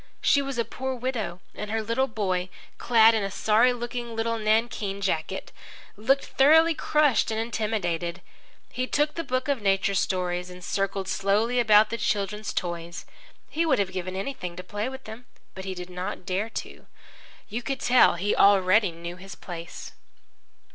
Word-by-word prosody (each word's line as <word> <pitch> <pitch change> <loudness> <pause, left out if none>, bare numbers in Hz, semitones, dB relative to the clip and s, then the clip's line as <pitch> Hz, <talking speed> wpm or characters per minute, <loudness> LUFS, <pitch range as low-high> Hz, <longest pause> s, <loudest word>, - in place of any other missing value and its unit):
She 280 - +3
was 275 -2 -4
a 235 - +1
poor 265 0 -4
widow, 230 -8 -3
and 210 - -6
her 220 +1 -1
little 230 +5 0
boy, 185 -5 -2 0.3
clad 230 -1 +6
in 220 - +1
a 195 - -2
sorry 220 +5 +3
looking 240 -1 -5
little 230 0 -1
nankeen 215 -2 0
jacket, 190 -1 -2 0.4
looked 265 +7 +1
thoroughly 320 +4 +5
crushed 300 -4 +2
and 220 0 -1
intimidated. 195 -7 -2 0.5
He 255 0 -2
took 295 +2 +1
the 335 - -3
book 255 -2 -2
of 280 -5 0
nature 195 0 +2
stories 180 -2 -1
and 180 0 -11
circled 195 +1 -2
slowly 210 +6 +1
about 215 -2 +5
the 230 - -2
children's 210 -1 -1
toys. 170 -1 -4 0.4
He 325 - -1
would 305 -6 +3
have 195 -3 0
given 185 0 -4
anything 190 -4 -4
to 180 - -7
play 210 +5 -3
with 265 0 -9
them. 220 +3 -10 0.3
But 190 - -8
he 190 -1 -4
did 180 0 -8
not 180 +1 -5
dare 195 +4 -1
to. - - -7 0.6
You 230 +4 -4
could 270 +2 -3
tell 245 -5 +5
he 195 +4 0
already 200 0 +5
knew 170 +1 -8
his 195 +1 -10
place. 170 -2 -8
210 Hz, 170 wpm, -26 LUFS, 185-240 Hz, 0.6 s, clad